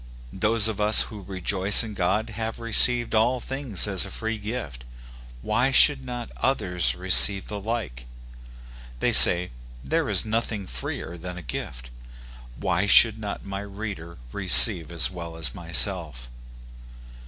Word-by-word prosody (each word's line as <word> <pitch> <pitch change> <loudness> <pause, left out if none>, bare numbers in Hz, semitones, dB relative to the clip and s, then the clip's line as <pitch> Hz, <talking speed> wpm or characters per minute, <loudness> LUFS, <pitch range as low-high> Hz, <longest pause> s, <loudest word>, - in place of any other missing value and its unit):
Those 105 +3 0
of 105 -2 -6
us 105 +1 +2
who 105 -2 -9
rejoice 95 +2 +2
in 110 -2 -9
God 105 +5 -3
have 110 +1 -8
received 120 +1 +4
all 120 +3 -1
things 130 -7 -1
as 95 -3 -1
a - - -8
free 110 -1 -7
gift; 100 - -9 0.6
why 130 - -2
should 135 0 +2
not 120 -2 -9
others 90 -10 -3
receive 95 +2 +3
the 105 - -7
like? 100 - -7 0.9
They - - -2
say, 90 +1 +5 0.2
" - - -20
There - - -2
is - - +1
nothing 110 -2 -4
freer 85 +5 -9
than 90 +1 -10
a 90 - -11
gift - - -9 0.3
": - - -20 0.3
why 95 +3 -3
should 110 +2 +3
not 105 -2 -9
my 100 0 -8
reader 100 -5 -10
receive 80 +5 +6
as 85 +2 +1
well 85 -2 -10
as 75 -7 +1
myself 75 -5 +3
100 Hz, 150 wpm, -22 LUFS, 85-110 Hz, 0.9 s, receive